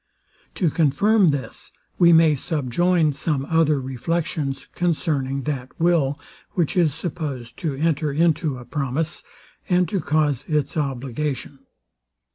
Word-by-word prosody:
To 170 -5 +1
confirm 180 +6 +3
this, 135 -6 -4 0.3
we 170 -2 +7
may 165 -2 +6
subjoin 155 +3 +1
some 140 -1 -1
other 155 -2 +2
reflections 135 +2 -3
concerning 145 -6 -1
that 130 -3 -5
will, 160 -5 +2 0.3
which 170 -5 0
is 165 -6 +2
supposed 145 -8 -5
to 155 -5 -2
enter 150 0 0
into 155 -2 +1
a 120 - -10
promise, 150 +4 -2 0.5
and 180 -1 +3
to 195 - 0
cause 150 -4 0
its 150 -3 0
obligation. 140 0 -3
150 Hz, 120 wpm, -22 LUFS, 135-165 Hz, 0.5 s, we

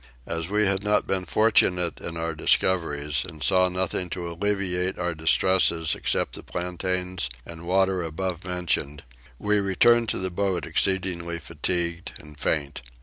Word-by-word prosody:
As 80 0 -3
we 105 +1 +2
had 95 0 +1
not 105 0 +2
been 95 -1 -1
fortunate 90 -4 +2
in 85 -1 -6
our 80 0 -2
discoveries, 75 -3 +1
and 75 -2 -8
saw 90 +7 +4
nothing 90 0 -1
to 85 0 -4
alleviate 95 0 -1
our 90 -1 -1
distresses 80 0 +3
except - - -1
the - - -4
plantains 90 -3 -2 0.2
and 85 0 -9
water 95 0 +2
above 85 +2 -4
mentioned, 85 -5 -2 0.3
we 105 +6 +1
returned 115 +4 +3
to - - 0
the 95 0 -2
boat 95 0 -1
exceedingly 90 -3 0
fatigued 85 +2 -2
and 75 -1 -14
faint. 70 -3 -1
90 Hz, 145 wpm, -25 LUFS, 85-95 Hz, 0.3 s, saw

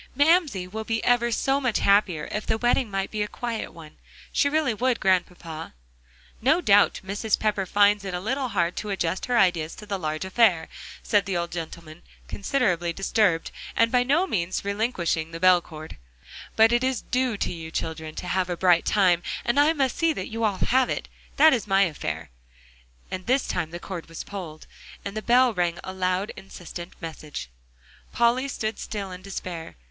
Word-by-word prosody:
"Mamsie 290 - +3
will 220 +4 -6
be 225 0 -2
ever 240 -1 +3
so 270 +4 +1
much 250 -5 +1
happier 195 -6 +2
if 210 - -4
the 220 - +1
wedding 240 0 +1
might 195 -1 -2
be 215 - -2
a 210 - 0
quiet 235 0 -4
one. 155 -2 -13 0.3
She 285 - +2
really 300 -4 +1
would, 245 +2 0
Grandpapa." 175 - -1 0.7
"No 275 +9 +4
doubt 205 - +4
Mrs. 205 +2 0
Pepper 205 -3 0
finds 205 +1 +4
it 190 -2 -4
a - - -2
little 260 +7 -1
hard 175 -6 0
to 210 - -4
adjust 185 -2 -2
her 245 -1 +1
ideas 175 -6 +2
to 210 - -11
the 200 -2 -3
large 155 +1 -3
affair," 190 -4 +3 0.3
said 205 -2 +2
the 190 -3 -1
old 170 0 -3
gentleman, 165 -1 -7 0.3
considerably 195 -7 0
disturbed, 195 -1 +1 0.2
and 230 0 +3
by 250 - +4
no 285 +9 +2
means 185 - -2
relinquishing 200 -6 -1
the 165 0 -7
bell 185 0 +6
cord, 155 - -10 0.6
"but 225 +1 +6
it 240 +1 +2
is 260 -2 0
due 250 -3 0
to - - -2
you 165 -1 -7
children 160 -1 -4
to 180 - -6
have 185 0 0
a 175 - -2
bright 175 -2 +4
time, 185 -4 +3 0.2
and 240 +4 +2
I 295 +2 +5
must 270 -5 0
see 330 -1 +3
that 185 - -5
you 225 +1 -4
all 205 -3 +1
have 255 +4 +2
it. - - -3 0.3
That 315 +2 +7
is 230 -5 -1
my 195 0 +4
affair," 80 - -4 0.8
and 185 +2 -5
this 260 +2 +2
time 170 -3 -2
the 170 - -6
cord 175 -3 -7
was 165 - -7
pulled, 175 -6 -8 0.4
and 200 +1 -5
the 215 - -2
bell 245 +1 +4
rang 175 -3 0
a 185 - -6
loud, 185 +2 -1
insistent 175 -2 -9
message. 155 - -7 0.6
Polly 240 +3 +2
stood 220 -5 -3
still 200 -3 -5
in 180 0 -8
despair. 185 -4 -6
195 Hz, 190 wpm, -25 LUFS, 175-235 Hz, 0.8 s, That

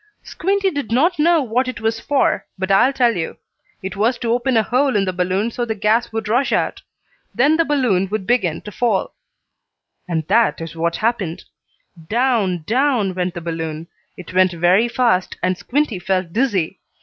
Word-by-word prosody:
Squinty 390 +2 -1
did 285 -7 -4
not 315 +8 +2
know 330 0 +4
what 250 +2 0
it 255 - -5
was 225 0 -1
for, 280 +4 0
but 190 +1 -2
I'll 240 +7 +5
tell 245 -4 +2
you. 165 -2 -4 0.5
It 190 +2 -5
was 225 +5 +1
to 235 -1 -2
open 245 0 +1
a 220 - +4
hole 260 +3 +1
in 200 -1 +2
the 185 - -2
balloon 185 +5 -1
so 240 - -3
the 225 -2 -2
gas 220 +4 +1
would 225 -1 -4
rush 245 +5 +1
out. - - 0 0.5
Then 285 +6 +4
the 330 0 +2
balloon 235 - +1
would 210 -2 -3
begin 185 -9 0
to 210 - -9
fall. 220 -3 0 0.9
And 160 -3 -2
that 230 +7 +2
is 165 -1 -7
what 170 +1 -1
happened. 190 -7 -1 0.7
Down, 220 -8 +1
down 240 - +1
went 180 -1 -2
the 175 - -5
balloon. 165 -1 -5 0.3
It 180 0 -10
went 185 -1 +3
very 180 +7 +3
fast, 235 -7 +1
and 185 0 +1
Squinty 250 -1 -1
felt 185 -2 -2
dizzy. 205 -8 0
220 Hz, 185 wpm, -19 LUFS, 185-250 Hz, 0.9 s, I'll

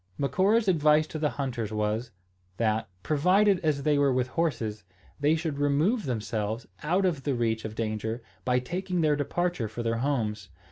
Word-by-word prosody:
Macora's 200 +9 +2
advice 155 -3 +4
to 155 - -6
the 150 -1 +1
hunters 120 -5 -3
was, 105 +2 -1 0.5
that, 110 -2 0
provided 185 +6 +3
as 150 -4 0
they 150 -2 +3
were 140 -1 +4
with 125 0 0
horses, 120 -9 -1 0.4
they 145 +2 +3
should 155 -3 -3
remove 150 - +2
themselves 110 -1 -2
out 180 +6 +1
of 165 -7 0
the 140 -1 -1
reach 110 -2 0
of 110 0 -5
danger, 110 +1 -3 0.2
by 125 +3 +2
taking 180 +7 -2
their 155 -2 +3
departure 160 -2 -1
for 115 +3 -5
their 115 0 0
homes. 115 - -1
140 Hz, 170 wpm, -28 LUFS, 115-160 Hz, 0.5 s, advice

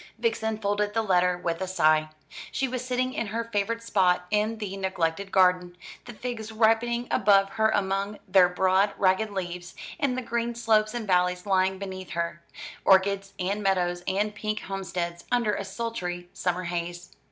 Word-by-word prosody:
Vixen 220 -1 -1
folded 205 0 -1
the 225 - +2
letter 180 -3 +2
with 170 -1 -3
a 190 - -1
sigh. 155 -4 +3 0.4
She 270 - 0
was 255 -1 -4
sitting 255 0 -1
in 230 - -2
her 225 +3 -2
favourite 230 +1 -2
spot 180 -5 +2
in 215 +2 +1
the 205 -3 -5
neglected 190 0 -2
garden, 180 -1 +3 0.3
the 240 - -8
figs 225 -1 -5
ripening 230 +2 +2
above 195 -1 +4
her 220 +1 +2
among 200 0 -1
their 185 -1 +5
broad 190 +2 +2
ragged 190 +3 +2
leaves, 180 -3 -5 0.2
and 270 -4 0
the 255 - -2
green 235 0 -2
slopes 220 -1 +2
and 235 -2 -3
valleys 180 -1 +1
lying 190 -1 +2
beneath 190 -1 -7
her 170 -1 -3 0.4
orchards 195 +1 +3
and 195 +3 -1
meadows 180 -3 +1
and 210 +2 0
pink 215 0 -3
homesteads, 175 -3 -4
under 235 -4 +2
a 200 - -2
sultry 190 -4 -4
summer 180 0 -1
haze. 175 0 -4
195 Hz, 165 wpm, -27 LUFS, 180-220 Hz, 0.4 s, their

